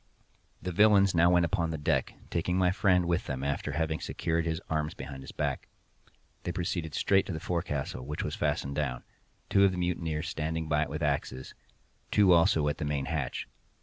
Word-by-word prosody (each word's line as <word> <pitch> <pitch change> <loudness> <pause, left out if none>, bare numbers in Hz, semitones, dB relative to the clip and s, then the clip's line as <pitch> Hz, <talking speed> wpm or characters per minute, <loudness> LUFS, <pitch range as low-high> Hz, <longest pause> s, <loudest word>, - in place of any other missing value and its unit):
The 90 - -2
villains 100 0 +5
now 85 +1 +5
went 90 -1 +4
upon 85 -1 0
deck, 80 -2 0 0.2
taking 90 +2 0
my 90 -1 +3
friend 95 -3 +3
with 85 +1 0
them 65 -1 -3
after 70 +1 -2
having 80 +1 -1
secured 85 0 -1
his 80 0 -1
arms 75 -1 -1
behind 70 -1 -7
his 65 - -9
back. - - -2 0.7
They 90 - -3
proceeded 85 -3 -3
straight 95 -1 +3
to - - -3
the 80 - -4
forecastle, 80 -7 -3
which 75 +3 -4
was - - -3
fastened 70 - -1
down—two 75 +7 -2
of 100 - +5
the 90 - -4
mutineers 85 -3 -1
standing 80 +1 -2
by 75 -1 +2
it 75 - -1
with 75 +2 -4
axes—two 75 +7 -1
also 85 -3 +4
at 75 - -1
the - - -2
main 70 -2 -1
hatch. 75 -5 -3
80 Hz, 180 wpm, -29 LUFS, 75-90 Hz, 0.7 s, villains